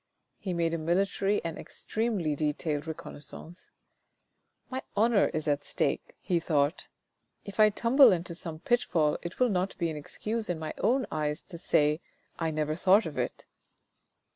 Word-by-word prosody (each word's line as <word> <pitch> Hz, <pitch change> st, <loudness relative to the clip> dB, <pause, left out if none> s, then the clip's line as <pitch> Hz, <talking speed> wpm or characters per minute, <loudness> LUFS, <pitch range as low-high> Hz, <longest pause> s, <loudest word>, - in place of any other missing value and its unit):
He 190 Hz, -, -4 dB
made 165 Hz, -1 st, +1 dB
a 165 Hz, -, -1 dB
military 195 Hz, +4 st, +1 dB
and 165 Hz, -1 st, -4 dB
extremely 210 Hz, -9 st, -2 dB
detailed 150 Hz, +1 st, -1 dB
reconnaissance. 160 Hz, +2 st, -9 dB, 0.5 s
" -, -, -48 dB
My 260 Hz, +1 st, -2 dB, 0.2 s
honour 220 Hz, 0 st, +4 dB
is 155 Hz, 0 st, -3 dB
at 145 Hz, -1 st, +1 dB
stake," -, -, -1 dB
he 175 Hz, -2 st, 0 dB
thought. 150 Hz, -1 st, 0 dB, 0.3 s
" -, -, -46 dB
If 200 Hz, +1 st, -8 dB
I 215 Hz, 0 st, +8 dB
tumble 240 Hz, +6 st, +6 dB
into 175 Hz, -1 st, -1 dB
some 165 Hz, -2 st, -5 dB
pitfall 160 Hz, -7 st, +1 dB
it 175 Hz, 0 st, -7 dB
will 250 Hz, -1 st, +4 dB
not 190 Hz, -1 st, -1 dB
be 170 Hz, -2 st, 0 dB
an 155 Hz, -, -5 dB
excuse 215 Hz, +9 st, -4 dB
in 175 Hz, -, 0 dB
my 160 Hz, -1 st, -5 dB
own 260 Hz, +2 st, +2 dB
eyes 150 Hz, 0 st, -1 dB
to 170 Hz, -, -9 dB
say, 150 Hz, 0 st, +2 dB, 0.2 s
* -, -, -40 dB
I 165 Hz, -1 st, 0 dB
never 155 Hz, 0 st, -1 dB
thought 195 Hz, +5 st, +4 dB
of 155 Hz, -, -5 dB
it.' -, -, -3 dB
170 Hz, 170 wpm, -29 LUFS, 155-200 Hz, 0.5 s, I